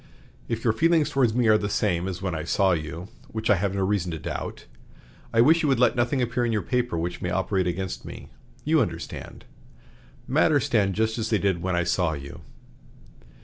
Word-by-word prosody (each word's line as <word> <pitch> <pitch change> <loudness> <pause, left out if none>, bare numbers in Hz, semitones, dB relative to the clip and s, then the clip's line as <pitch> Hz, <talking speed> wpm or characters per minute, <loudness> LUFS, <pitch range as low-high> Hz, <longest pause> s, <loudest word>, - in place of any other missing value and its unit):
If 115 -1 -3
your 115 - +3
feelings 160 +3 +2
toward 125 -6 +2
me 125 -1 +2
are 110 0 +5
the 105 - -2
same 90 -4 0
as 95 0 -5
when 90 -3 -1
I 80 -2 -3
saw 95 +3 +2
you 85 +3 -4 0.2
(which 110 0 -1
I - - +6
have 100 +1 -1
no 95 -1 +1
reason 95 -3 0
to 80 - -4
doubt), 75 - -6 0.7
I 115 - +4
wish 160 +6 +5
you 155 - +1
would 135 - +3
let 125 -2 +4
nothing 125 +2 +1
appear 120 +1 -1
in 120 - 0
your 105 -3 0
paper 125 -6 -1
which 85 +2 -3
may 90 - -2
operate 95 +1 0
against 90 -8 -3
me. - - -10 0.3
You 155 0 +3
understand. 115 - -5 0.8
Matters - - +3
stand 100 -3 +1
just 110 +1 0
as 110 0 -2
they 110 - +3
did 95 -3 0
when 95 0 -1
I 85 - +1
saw 85 -1 +1
you. 70 -1 -8
100 Hz, 210 wpm, -25 LUFS, 90-120 Hz, 0.8 s, I